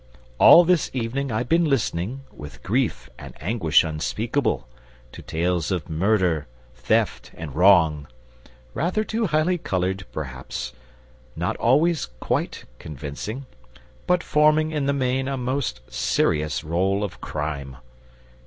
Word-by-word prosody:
All 175 - +9
this 180 -2 +2
evening 130 +3 -2
I've 110 +3 -1
been 165 +3 +3
listening, 120 - -1
with 75 0 -11
grief 125 +3 -1
and - - -10
anguish 85 -3 +3
unspeakable, 80 - -1 0.4
to - - -10
tales 85 +1 -1
of 90 -3 -3
murder, 90 -3 +1 0.3
theft, 65 - 0
and 75 -4 -7
wrong; 80 -5 +4 0.7
rather 185 +7 0
too 220 0 -1
highly 165 +3 +1
coloured, 95 - -2
perhaps, 65 -3 -6 0.6
not - - -1
always 155 +7 +2
quite - - -2
convincing, 75 - -6 0.6
but 180 -1 +2
forming 155 +1 +3
in 150 -3 -1
the 140 - +2
main 130 -1 0
a 135 -1 -2
most 125 - -2
serious 75 0 0
roll 95 +5 0
of 100 - -6
crime. 70 -4 -4
100 Hz, 125 wpm, -23 LUFS, -, 0.7 s, All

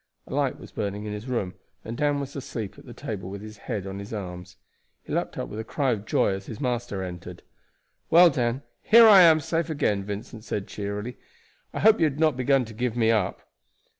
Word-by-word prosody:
A - - -9
light - - 0
was - - -12
burning 105 0 -4
in 105 - -4
his 105 +4 -7
room, 110 -8 -2 0.3
and 115 - -5
Dan 145 +2 +1
was 140 0 -6
asleep 115 -7 -6
at - - -16
the - - -9
table 95 -4 -5
with 100 +1 -7
his 110 0 -10
head 105 -5 -2
on 95 0 -6
his 100 +1 -8
arms. 90 -3 -7 0.5
He - - -7
leaped - - -2
up - - -3
with 105 - -7
a - - -3
cry 135 +3 0
of 110 -2 -3
joy - - +2
as 95 0 -6
his 110 - -7
master 120 -7 -2
entered. 90 -2 -8 0.7
"Well, 175 +1 +7
Dan, 125 0 -1 0.2
here 230 +1 +7
I 200 -3 +9
am 160 -2 +7
safe 165 +2 -1
again," 105 -10 0
Vincent 105 +2 -7
said 100 -3 -3
cheerily. 105 +4 -5 0.5
"I - - -4
hope 220 0 +6
you 160 - +4
had 145 0 -5
not 155 -3 +3
begun 130 0 +2
to 110 - -10
give 120 +1 -2
me 115 -1 +4
up." 105 -5 -1
115 Hz, 225 wpm, -26 LUFS, 100-140 Hz, 0.7 s, I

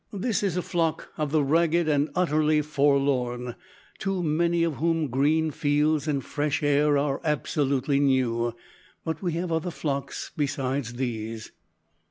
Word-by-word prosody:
This 205 +2 -1
is 190 -4 -1
a 180 - -1
flock 165 -2 -1
of 150 -2 -2
the 155 -1 +3
ragged 165 +3 +2
and 145 0 +2
utterly 155 -3 +2
forlorn, 135 -4 +1 0.5
to 195 -2 -1
many 170 +2 +1
of 165 -4 -1
whom 165 -2 0
green 155 +5 +2
fields 150 +1 +1
and 140 -3 -1
fresh 150 +1 -1
air 145 0 +3
are 140 -1 0
absolutely 140 -2 0
new, 120 -4 +1 0.5
but 160 -1 -3
we 175 -4 -1
have 170 +1 -2
other 160 +2 0
flocks 140 -5 -4
besides 135 -4 -2
these." 115 -3 -4
150 Hz, 145 wpm, -26 LUFS, 140-160 Hz, 0.5 s, the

